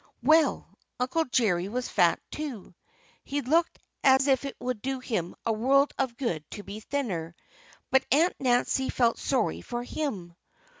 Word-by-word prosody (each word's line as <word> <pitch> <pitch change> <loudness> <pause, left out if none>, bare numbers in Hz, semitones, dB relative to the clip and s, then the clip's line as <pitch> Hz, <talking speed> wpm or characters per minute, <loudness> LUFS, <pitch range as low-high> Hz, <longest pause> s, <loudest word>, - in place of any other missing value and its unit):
Well, 315 0 +4 0.3
Uncle 260 +6 +1
Jerry 205 - +1
was 250 +3 -3
fat, 175 -4 +3
too. 275 -13 -6 0.5
He 285 +1 -2
looked 320 +6 +1 0.3
as 265 0 +5
if 270 -1 +2
it 275 - -5
would 250 -4 -3
do 265 +2 -2
him 215 -9 -3
a 225 - +2
world 275 +6 +3
of 255 -3 -1
good 175 - -2
to 205 - -8
be 205 +2 -7
thinner. 195 - -3 0.6
But 265 0 +3
Aunt 320 +7 +4
Nancy 260 +1 +1
felt 235 -2 +2
sorry 260 -5 0
for 240 0 -4
him. 210 - -4
255 Hz, 155 wpm, -28 LUFS, 215-275 Hz, 0.6 s, as